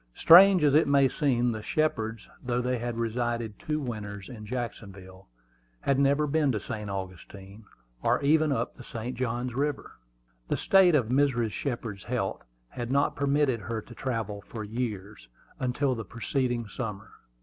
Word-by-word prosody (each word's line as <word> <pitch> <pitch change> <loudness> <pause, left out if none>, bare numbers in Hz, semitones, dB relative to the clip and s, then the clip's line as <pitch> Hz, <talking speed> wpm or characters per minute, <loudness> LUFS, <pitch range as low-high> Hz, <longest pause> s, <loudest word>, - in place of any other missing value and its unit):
Strange 185 0 +8
as 145 -2 +4
it 155 +1 +5
may 140 -1 +5
seem, 125 -4 +1
the 110 -1 -5
Shepards, 115 -6 -1 0.2
though 120 -1 -1
they 125 0 -1
had 120 0 -4
resided 115 -2 -2
two 155 0 -2
winters 105 -7 -6
in 110 -4 -9
Jacksonville, 100 -6 -7 0.5
had 140 -1 +1
never 140 +2 +3
been 150 -1 +2
to 110 - -1
St. 105 0 -6
Augustine, 95 +2 -8 0.4
or - - +2
even 155 +1 +3
up 140 - -2
the 125 - -10
St. 120 +1 -6
Johns 125 0 -2
River. 145 - -3 0.5
The - - 0
state 190 -4 +5
of 125 -6 +1
Mrs. 125 -4 +2
Shepard's 115 -5 -4
health 120 -6 -2 0.3
had 120 -1 -5
not 140 +2 +2
permitted 140 -3 +1
her 110 +3 -4
to 120 - -12
travel 110 -5 -3
for 110 +1 -7
several - - -12
years, 105 - -5 0.3
until 130 +2 0
the 115 -2 -5
preceding 120 0 -2
summer. 105 -2 -6
120 Hz, 160 wpm, -28 LUFS, 110-140 Hz, 0.5 s, Strange